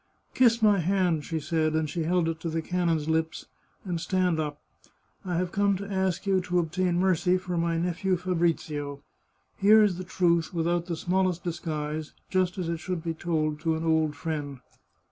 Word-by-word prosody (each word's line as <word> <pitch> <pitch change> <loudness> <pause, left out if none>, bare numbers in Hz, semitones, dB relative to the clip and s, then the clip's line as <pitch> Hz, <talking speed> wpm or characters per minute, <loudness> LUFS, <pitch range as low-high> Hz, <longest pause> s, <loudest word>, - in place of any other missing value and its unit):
" - - -42
Kiss 235 -3 +4
my 205 -2 +5
hand," 175 -3 +1
she 165 -2 -2
said, 155 0 0
and 160 -1 +1
she 160 +2 -3
held 175 0 +2
it 165 -1 -2
to 165 - -3
the 160 0 -2
canon's 170 -4 0
lips, 160 0 -1 0.2
" - - -37
and 175 -3 -2
stand 180 -3 +1
up. 150 -1 -3 0.6
I 180 -2 -2
have 180 +1 -1
come 200 0 +2
to 200 - -6
ask 190 0 0
you 190 -1 +2
to 180 0 -1
obtain 175 +1 0
mercy 180 0 +2
for 180 -1 -4
my 170 0 0
nephew 180 +2 0
Fabrizio. 165 -5 -1 0.5
Here 215 +2 +6
is 190 -4 +1
the - - -4
truth, 175 -1 +1
without 170 +1 0
the 170 - -2
smallest 180 0 0
disguise, 155 -3 -4 0.2
just 185 -1 +1
as 180 -3 -2
it 170 0 -1
should 175 0 -4
be 165 -1 -2
told 155 -2 -1
to 160 0 0
an 160 +1 -3
old 160 -2 +2
friend. 145 -3 -4
170 Hz, 195 wpm, -27 LUFS, 160-185 Hz, 0.6 s, Here